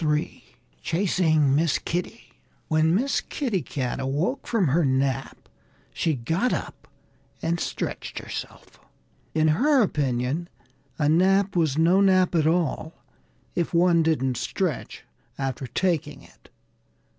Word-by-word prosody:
III 150 -1 -1 0.4
CHASING 160 -6 +2
MISS 160 0 +2
KITTY 180 +7 -5 0.4
WHEN 160 +1 +3
Miss 265 +7 +1
Kitty 235 - -2
Cat 130 -4 -3
awoke 145 - -2
from 205 - +1
her 165 +6 +2
nap 130 -1 -1 0.5
she 160 -3 0
got 165 - 0
up - - -5 0.6
and 170 +1 0
stretched - - -4
herself. - - -8 0.6
In 155 0 +3
her 265 - +4
opinion, 140 - -1 0.5
a 145 - +1
nap 190 +5 +3
was 155 -5 +1
no 175 +4 +4
nap 185 -2 +4
at 160 -3 +2
all 160 -1 0 0.6
if 170 0 -2
one 170 -1 +4
didn't 135 -6 0
stretch 165 +2 -3 0.3
after 135 -1 -3
taking 150 -1 -1
it. - - -21
160 Hz, 120 wpm, -25 LUFS, 145-185 Hz, 0.6 s, her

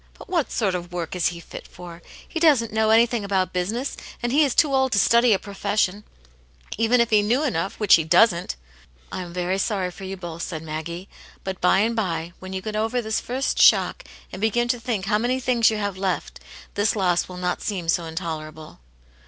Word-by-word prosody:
But - - -13
what 340 -6 0
sort 200 -5 0
of 175 -1 -5
work 175 0 -4
is 180 - +2
he 170 -1 -4
fit - - -10
for? 175 -1 -11 0.3
He 330 - -4
doesn't 275 -10 +3
know 220 0 +2
anything 230 0 +3
about 190 -2 0
busi 180 +3 -1
ness, 255 +4 -4 0.3
and 240 - 0
he 295 +4 +4
is 275 -4 0
too 295 -4 +3
old 265 -1 +2
to - - +2
study 235 +4 +4
a 200 - +5
professioni 200 0 -1 0.7
even 230 +3 +2
if 235 -1 +2
he 210 -1 +5
knew 240 +8 +1
enough, 195 - -2
which 210 -3 +4
he 160 - +6
doesn't." 170 - +3 0.6
"I - - -4
am 175 -1 -8
very 180 +2 -1
sorry 190 -3 -1
for 195 - -12
you 190 0 -5
both," 170 -2 -7
said 160 -2 -5
Maggie. 160 +4 -6 0.2
" - - -23
But 190 -1 -5
by 185 +2 +4
and 230 +2 +1
by, 170 -5 -2
when 185 0 -9
you 190 0 -4
get 215 -1 -4
over 225 +3 0
this 220 -2 -1
first 260 +2 -1
shock, - - +4 0.3
and 185 - -8
begin 240 +2 +1
to 245 - +1
think 225 -5 -3
how 210 +1 +1
many 250 +3 0
things 245 -3 +3
you 220 - -2
have 200 -2 -3
left, 190 -2 -2 0.3
this 205 +2 +1
loss 180 -4 +1
will 180 - -8
not 180 0 -2
seem 185 -5 -3
so 170 0 +1
intolerable. 160 -2 -6
200 Hz, 220 wpm, -23 LUFS, 180-230 Hz, 0.7 s, he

